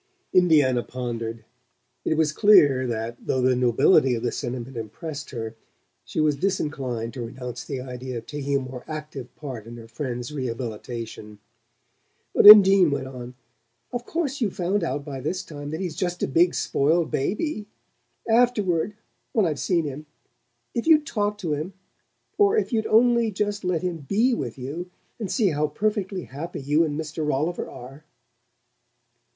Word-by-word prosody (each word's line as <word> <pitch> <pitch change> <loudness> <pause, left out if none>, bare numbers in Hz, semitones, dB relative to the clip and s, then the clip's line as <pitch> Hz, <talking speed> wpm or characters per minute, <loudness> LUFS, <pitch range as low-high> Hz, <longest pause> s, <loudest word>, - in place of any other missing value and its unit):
Indiana 150 -9 +4
pondered: 115 -3 -5 0.6
it - - +1
was 155 -2 +2
clear 150 - +5
that, 115 0 -3
though 130 - +1
the 130 0 +3
nobility 125 +3 +4
of 115 - -5
the 120 - 0
sentiment 125 0 -5
impressed 140 - -6
her, 115 -3 -5 0.5
she - - -5
was 155 -2 +3
disinclined 135 - -2
to 130 - -6
renounce 125 +1 -6
the 135 -3 -5
idea 125 0 -6
of 115 - -7
taking 140 -1 -3
a - - -2
more 130 -1 -8
active 150 -5 -7
part 125 -7 -7
in 120 +1 -9
her 115 -1 -11
friend's 125 +2 -5
rehabilitation. 115 -4 -5 1.0
But - - +6
Undine 195 -4 +10
went 140 -2 -2
on: 125 -1 -9 0.6
"Of 245 0 -4
course 290 -5 -2
you've 205 -5 0
found 185 +2 0
out 145 -3 -2
by 140 -3 -6
this 185 +8 -2
time 145 -2 -8
that 160 +2 -4
he's 175 -5 -3
just 175 +1 -2
a - - +2
big 170 +6 +3
spoiled 160 +4 +1
baby. 210 - -2 0.6
Afterward 210 -6 +2 0.4
when 215 -4 +3
I've 155 -4 -1
seen 170 -4 +1
him 145 +2 -6 0.7
if 235 - -2
you'd 305 -2 +6
talk 210 -5 -1
to 175 -7 -2
him; 155 +6 -4 0.7
or 410 +1 +5
it 430 - 0
you'd 220 -2 0
only 235 0 +4
just 205 0 -2
let 180 -2 -1
him 180 -2 -2
BE 235 +6 +3
with 230 - -4
you, 150 +8 -6 0.3
and 210 -4 -4
see 215 -5 +2
how 150 -1 0
perfectly 195 +2 -2
happy 155 +6 -7
you 145 +4 +2
and 150 -1 -2
Mr. 155 0 -4
Rolliver 150 +4 -1
are!" 135 +5 -11
150 Hz, 165 wpm, -24 LUFS, 125-190 Hz, 1.0 s, Undine